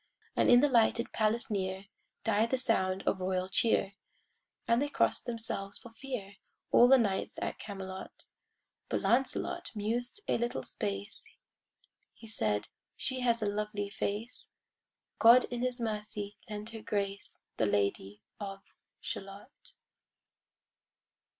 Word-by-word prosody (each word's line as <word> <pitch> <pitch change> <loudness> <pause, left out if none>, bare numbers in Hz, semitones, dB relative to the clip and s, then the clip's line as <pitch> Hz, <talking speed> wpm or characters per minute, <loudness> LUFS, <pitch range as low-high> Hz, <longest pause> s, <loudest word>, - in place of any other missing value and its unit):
And - - +4
in 245 0 +8
the 290 - +5
lighted 235 -2 +3
palace 220 +1 +1
near 190 -1 -2 0.4
Died 225 +1 +2
the 260 - +2
sound 190 -6 +1
of 190 - 0
royal 185 0 0
cheer; 200 0 +2 0.7
And 235 +2 +4
they 290 - 0
cross'd - - +1
themselves 225 -4 -2
for 235 - -11
fear, 225 -6 -6 0.3
All 240 - +8
the 270 +1 +8
knights 205 -6 0
at - - -3
Camelot: 190 -2 -7 0.6
But - - 0
Lancelot 270 +7 +1
mused 235 - -1
a - - +2
little 235 - -1
space; 100 -2 -3 0.9
He 225 - -13
said, 105 - 0 0.3
"She 260 -1 -1
has 235 -3 +2
a - - +1
lovely 205 0 -2
face; 210 +4 -3 0.6
God 235 +2 +8
in 240 -1 -2
His 250 0 -1
mercy 210 -2 -3
lend 210 +1 -4
her 225 -1 -7
grace, 200 -1 -2
The 110 - +2
Lady 100 0 0 0.2
of 195 -1 -6 0.4
Shalott." 195 +7 -8
210 Hz, 130 wpm, -32 LUFS, 195-235 Hz, 0.9 s, in